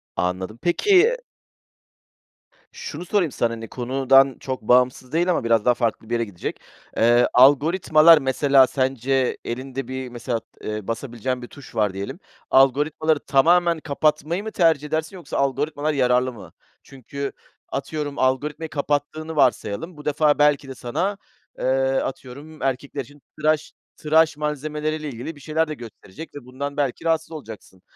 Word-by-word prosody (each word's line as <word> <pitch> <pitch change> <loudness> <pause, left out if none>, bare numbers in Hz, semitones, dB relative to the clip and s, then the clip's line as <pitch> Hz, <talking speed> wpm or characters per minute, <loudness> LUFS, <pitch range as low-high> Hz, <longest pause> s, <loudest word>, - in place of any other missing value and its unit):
Anladım. 95 +4 -2
Peki 400 - +3 1.5
şunu 470 - -7
sorayım 180 -4 +1
sana, 120 -1 0
hani, 115 0 -7
konudan 135 +2 +3
çok 130 -1 -5
bağımsız 125 +2 +2
değil 175 +3 +2
ama 170 - 0
biraz 115 -2 +2
daha 125 - +5
farklı 115 -2 -2
bir - - -3
yere 115 - 0
gidecek. 100 -5 -6 0.4
Eee, 120 +2 +4
algoritmalar 155 +4 +6
mesela 135 -1 +4
sence 130 0 0
elinde 130 +1 -5
bir, 130 0 -5
mesela, 120 -1 -3
t 115 - -14
eee, 105 -2 -5
basabileceğin 120 +1 -3
bir 120 - -8
tuş 140 -2 -14
var 105 -3 +1
diyelim. 100 +1 -6 0.3
Algoritmaları 145 +3 +3
tamamen 170 +5 +3
kapatmayı 155 +4 0
mı 220 - -5
tercih 160 -6 +2
edersin 160 +4 -3
yoksa 180 - -6
algoritmalar 145 +2 0
yararlı 125 -1 +2
mı? 110 - -13 0.3
Çünkü 140 +1 -6 0.4
atıyorum 145 +1 -4
algoritmayı 145 +5 0
kapattığını 150 +2 -2
varsayalım, 145 - 0
bu 150 - -12
defa 150 0 +2
belki 145 -1 +3
de 135 - -7
sana, 170 +13 -2 0.4
eee, - - -5 0.3
atıyorum 140 +4 -5
erkekler 135 +2 -2
için 145 +3 -14 0.2
tıraş 155 0 +1 0.3
tıraş 160 0 +3
malzemeleriyle 150 +1 -3
ilgili 130 +6 -7
bir 145 - -15
şeyler 160 +2 0
de 155 - -4
gösterecek 120 +2 -11
ve 145 -4 -9
bundan 140 +3 -6
belki 140 +2 -2
rahatsız 160 0 0
olacaksın. 110 - -10
140 Hz, 145 wpm, -22 LUFS, 125-155 Hz, 1.5 s, algoritmalar